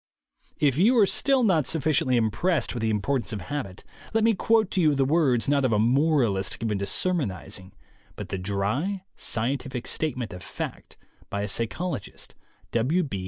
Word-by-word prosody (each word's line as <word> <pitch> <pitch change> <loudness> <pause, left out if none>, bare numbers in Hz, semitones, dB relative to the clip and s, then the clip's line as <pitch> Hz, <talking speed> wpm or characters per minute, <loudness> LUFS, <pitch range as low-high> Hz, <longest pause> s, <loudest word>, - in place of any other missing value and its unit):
If 145 -1 +2
you 235 +7 +5
are 215 - +7
still 270 +5 +2
not 170 - +3
sufficiently 150 -5 +2
impressed 120 - +1
with 120 - -4
the 110 - +1
importance 110 +2 -1
of 105 - -4
habit, 130 -7 -5 0.3
let 225 - +3
me 225 0 +4
quote 220 0 +2
to 185 - +1
you 155 -3 +4
the 135 -1 +2
words, 140 -5 +2
not 140 0 +2
of 130 - +2
a 110 - +3
moralist 120 -5 +2
given 110 -3 -2
to 100 - -3
sermonizing, 100 - -2 0.4
but - - -7
the 95 - -3
dry 105 - -2
scientific 130 +2 -2
statement 130 -9 -2
of 90 - -9
fact - - -7 0.3
by 100 0 -2
a - - -2
psycholo 115 - -2
gist, - - -12 0.4
W. 145 +9 +1
130 Hz, 170 wpm, -26 LUFS, 110-165 Hz, 0.4 s, are